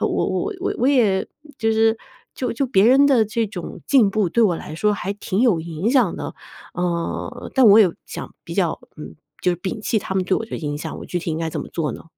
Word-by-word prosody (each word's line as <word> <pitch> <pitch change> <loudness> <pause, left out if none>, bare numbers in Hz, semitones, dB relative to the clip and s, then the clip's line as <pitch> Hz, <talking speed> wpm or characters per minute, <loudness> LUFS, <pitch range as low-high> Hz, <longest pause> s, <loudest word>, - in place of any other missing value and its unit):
我 - - +2
我 420 - -1
我 395 - -1
我 250 - +3
也 220 -9 +3 0.3
就 225 0 +1
是 225 0 +3 0.4
就 250 - -2
就 270 +3 -1
别 210 -5 +3
人 275 +3 +6
的 250 -6 +4
这 225 +1 -1
种 185 -4 -8
进 240 -8 +4
步 205 -3 +1
对 235 +7 +2
我 180 -6 +3
来 155 - -8
说 210 +5 +1
还 200 0 -3
挺 205 0 -2
有 215 -10 +3
影 170 +6 -2
响 250 -10 +3
的。 - - -6 0.4
呃， 175 +7 -3
但 260 -3 +6
我 205 +2 +8
有 185 -6 +5
想 - - -8
比 - - -8
较 - - 0 0.2
嗯， - - -9 0.3
就 180 - +2
是 - - -4
摒 195 +4 -4
弃 220 0 0
他 190 -1 -5
们 185 -1 +1
对 185 - +1
我 - - -3
的 - - -5
影 145 -2 -3
响， 150 - -6
我 - - -9
具 180 - -2
体 165 - -4
应 155 - -2
该 165 -1 -2
怎 - - -4
么 - - -7
做 150 -7 -2
呢？ - - -10
210 Hz, 265 characters per minute, -21 LUFS, 175-235 Hz, 0.4 s, 我